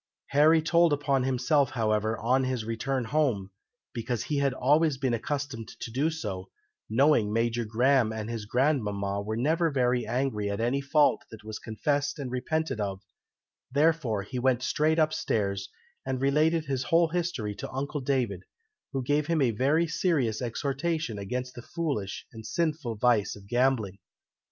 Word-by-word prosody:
Harry 155 +3 +5
told 170 0 +4
upon 140 -2 +1
himself, 130 +2 +2
however, 110 -2 0
on 130 +3 +2
his 130 -4 -2
return 125 +4 -2
home, 115 -7 0 0.4
because 120 -1 -2
he 150 - -2
had 140 -1 +2
always 145 +3 +2
been 130 -2 0
accustomed 135 -2 -3
to 120 - -6
do 140 +7 +1
so, 100 - -5 0.4
knowing 115 -2 +3
Major 115 +1 0
Graham 120 +1 +3
and 110 -1 -4
his 115 -2 -4
grandmama 105 -7 0
were 110 +2 -3
never 160 +7 +2
very 125 -4 +1
angry 120 -4 -1
at 100 - -3
any 125 +4 +1
fault 145 +2 +3
that 110 -2 -12
was 110 0 -6
confessed 145 +7 -1
and 135 -4 -5
repented 130 0 -1
of, 100 -2 -3 0.7
therefore 140 -7 +2
he 125 +5 -5
went 125 -1 +2
straight 155 +4 +1
up 155 -1 +3
stairs, 100 -6 -1 0.3
and 130 -1 -2
related 155 +4 +2
his 135 -2 -2
whole 165 +5 +3
history 165 -12 -2
to - - -7
uncle 140 +2 -3
David, 125 -8 0 0.5
who 135 -1 -1
gave 145 +3 +1
him 165 -1 +1
a 130 -4 +3
very 140 +9 +2
serious 150 - 0
exhortation 135 0 -2
against 125 +5 -4
the 120 - -8
foolish 140 - -3
and 110 -1 -9
sinful 155 -5 -1
vice 110 -2 +2
of 100 -1 -13
gambling. 120 -4 +1
130 Hz, 160 wpm, -28 LUFS, 110-145 Hz, 0.7 s, Harry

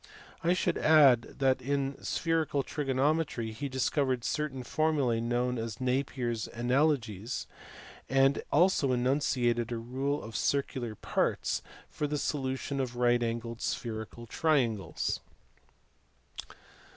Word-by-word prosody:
I 170 +1 +4
should 180 - 0
add 140 -7 +5
that 130 -1 +2
in 140 +1 -2
spherical 160 -4 0
trigonometry 140 -4 0
he 140 +6 -5
discovered 130 -1 0
certain 140 -3 -2
formulae 140 -4 +1
known 120 +1 0
as 115 -2 -5
Napier 130 -1 -1
s 115 -2 -3
analogies, 120 -3 0 0.6
and 135 +1 +3
also 155 -5 +3
enunciated 120 -2 +1
a 120 - -1
"rule 135 +5 -2
of 110 0 -9
circular 130 -5 -1
parts - - -1
" - - -21
for 150 - -2
the 150 +1 -1
solution 135 -1 -2
of 125 -2 -2
right 120 0 +3
angled 115 0 -3
spherical 115 0 -4
triangles. 115 - 0
130 Hz, 115 wpm, -30 LUFS, 120-140 Hz, 0.6 s, add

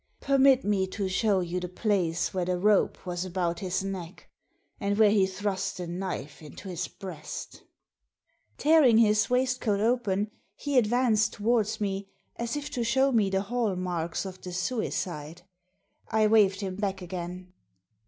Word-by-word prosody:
Permit 275 -1 +4
me 200 -2 +1
to 195 +1 -3
show 195 +1 +2
you 175 +1 -2
the 180 0 -5
place 180 -4 0
where 185 -2 -1
the 180 0 0
rope 205 +2 +2
was 175 -1 -3
about 175 -2 -2
his 190 -1 -2
neck, 185 -2 -6 0.5
and 200 -1 -1
where 215 -2 +6
he 200 -3 +4
thrust 195 0 -3
the 180 - -4
knife 175 -4 -5
into 155 +5 -10
his 180 -1 -3
breast" 170 -6 -8 1.0
Tearing 295 -7 +5
his 210 -2 +4
waistcoat 250 -4 +1
open 215 -3 +1 0.2
he 285 -3 +2
advanced 220 -2 +2
towards 220 0 +1
me, 195 -1 -3 0.3
as 235 +2 -3
if 290 0 -5
to 245 -4 -1
show 265 +4 +3
me 215 -5 +3
the 190 0 +1
hall 220 -1 -1
marks 175 -1 -3
of 185 -1 -8
the 180 - -7
suicide. 175 -5 -3 0.7
I 220 -1 +3
waved 210 -2 +4
him 190 -2 -4
back 195 -2 -2
again. 180 0 -7
195 Hz, 155 wpm, -28 LUFS, 180-220 Hz, 1.0 s, where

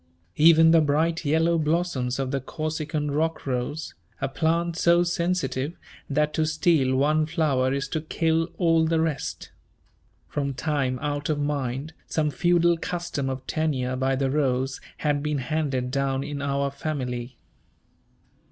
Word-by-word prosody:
Even 160 +1 +7
the 165 -1 +6
bright 160 +3 +1
yellow 165 +3 +2
blossoms 155 -5 0
of 135 -1 -2
the 135 -1 -1
Corsican 155 0 -3
rock 160 +3 -1
rose, 135 +4 -3 0.3
a 135 - -1
plant 165 +4 0
so 170 0 +4
sensitive 170 -4 -1 0.3
that 150 +1 +1
to 160 - +1
steal 155 -4 +2
one 155 +3 +2
flower 145 -6 +1
is 140 +2 -1
to 155 - -2
kill 165 +1 0
all 165 -2 +3
the 165 0 +2
rest. 135 - -3 0.8
From 140 -2 -2
time 135 -2 -1
out 145 0 -2
of 150 -1 0
mind, 145 0 -2
some 150 -2 0
feudal 175 +1 +3
custom 170 -6 -3
of 130 0 -5
tenure 130 -6 -1
by 135 +1 +1
the 135 0 0
rose 135 -2 0 0.2
had 145 -2 0
been 150 0 -1
handed 130 -2 -1
down 135 0 0
in 145 -1 -5
our 140 0 0
family. 130 -4 -4
150 Hz, 145 wpm, -25 LUFS, 135-160 Hz, 0.8 s, Even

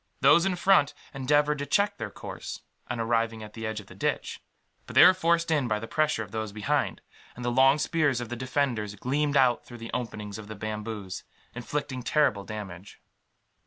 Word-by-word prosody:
Those 170 +5 +6
in 185 - 0
front 175 -5 +4 0.2
endeavoured 145 +2 +2
to 145 - -3
check 200 +8 +2
their 110 -2 -3
course, - - -8 0.3
on 120 - -3
arriving 115 -1 0
at 105 0 -10
the 110 -1 -5
edge 110 -1 -3
of 105 - -11
the - - -13
ditch; - - -2 0.5
but - - -9
they - - +10
were 185 - +8
forced 170 -2 +1
in 145 -5 +2
by 110 -2 +1
the 115 +2 -6
pressure 155 -6 +1
of 100 - -12
those 110 -1 -3
behind, 105 0 -1 0.3
and 125 - -7
the 120 - +1
long 135 +3 +5
spears 150 -5 +1
of 120 -2 -5
the 120 - -3
defenders 125 -5 -1
gleamed 140 +6 0
out 130 -3 +4
through 120 - -11
the 115 0 -8
openings 105 -4 -4
of 105 - -9
the 110 - -7
bamboos, 105 -2 -5 0.3
inflicting 130 +1 -4
terrible 125 -7 +2
damage. 100 -3 -8
120 Hz, 200 wpm, -27 LUFS, 110-145 Hz, 0.5 s, they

